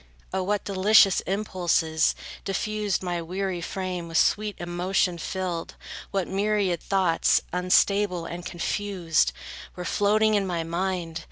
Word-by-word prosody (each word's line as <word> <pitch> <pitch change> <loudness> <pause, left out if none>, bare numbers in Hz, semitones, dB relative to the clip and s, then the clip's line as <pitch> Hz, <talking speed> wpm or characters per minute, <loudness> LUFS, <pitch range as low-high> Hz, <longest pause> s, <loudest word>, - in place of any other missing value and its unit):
O 190 - 0
what 205 +2 -1
delicious 200 0 +5
impulses, 175 -5 +1 0.3
diffused, 205 0 -1
My 175 -1 -2
weary 185 +1 -3
frame 180 -1 -4
with 165 0 -2
sweet 210 +2 +2
emotion 175 +1 0
filled! 180 -2 -4 0.3
What 195 -3 -1
myriad 200 -3 0
thoughts, 185 -4 +2
unstable 180 0 +2
and 175 +1 -6
confused, 175 - 0 0.4
Were 180 - -6
floating 215 +3 +2
in 200 -2 +1
my 170 -2 -1
mind! 170 -1 -2
185 Hz, 120 wpm, -26 LUFS, 175-200 Hz, 0.4 s, delicious